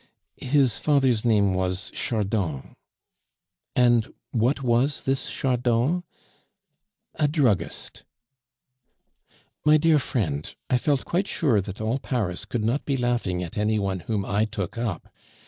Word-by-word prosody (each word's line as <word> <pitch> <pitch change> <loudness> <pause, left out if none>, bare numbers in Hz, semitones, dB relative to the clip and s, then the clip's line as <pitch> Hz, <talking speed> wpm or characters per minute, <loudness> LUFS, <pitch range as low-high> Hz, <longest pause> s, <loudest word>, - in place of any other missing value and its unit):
"His 130 -3 +2
father's 135 -7 +2
name 105 -5 +3
was 95 +1 -2
Chardon." 100 - -2 1.0
"And 120 -2 +3 0.2
what 125 +4 +1
was 125 +4 +1
this 135 0 -1
Chardon?" 125 +6 +1 1.1
"A 150 - +1
druggist." 140 - 0 1.6
"My 150 0 +6
dear 155 0 +4
friend, 80 - -2 0.2
I 125 - +4
felt 140 0 0
quite 190 +4 0
sure 125 -10 +2
that 100 0 -8
all 115 +5 0
Paris 105 -11 -2
could 120 -3 -3
not 120 +6 0
be 140 -2 -1
laughing 120 -8 0
at 85 +4 -5
any 110 +1 +1
one 95 -2 -1
whom 100 +1 -2
I 105 +2 +1
took 100 -2 -5
up. 115 -7 -4
120 Hz, 130 wpm, -25 LUFS, 100-135 Hz, 1.6 s, My